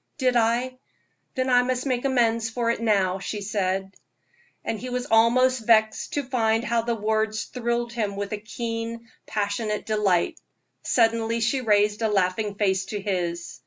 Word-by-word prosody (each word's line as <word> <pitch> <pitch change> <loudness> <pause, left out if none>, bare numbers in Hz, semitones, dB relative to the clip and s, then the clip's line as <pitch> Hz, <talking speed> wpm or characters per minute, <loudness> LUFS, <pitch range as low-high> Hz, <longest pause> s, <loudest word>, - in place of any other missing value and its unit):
"Did 255 -3 +1
I? 240 +2 +1 0.6
Then 255 0 0
I 245 0 +6
must 250 +1 -1
make 255 -1 -1
amends 230 -4 +2
for 230 0 0
it 235 - -4
now," 195 -4 +2
she 210 +2 -4
said. 195 -1 -2 0.7
And 220 - -2
he 255 - -6
was 250 0 -2
almost 235 +1 +3
vexed 220 -1 +3
to 290 - 0
find 230 -3 +1
how 230 +1 +1
the 235 +1 -1
words 215 0 -1
thrilled 235 -1 -2
him 210 -4 -2
with 200 0 -4
a - - -1
keen, 230 +1 -5 0.2
passionate 210 +1 -2
delight. 210 - +1 0.4
Suddenly 230 -1 +1
she 240 +4 +1
raised 210 -1 +2
a 220 - +2
laughing 200 +1 0
face 190 -2 +1
to 205 +1 -4
his. 175 -7 -3
225 Hz, 165 wpm, -25 LUFS, 205-240 Hz, 0.7 s, I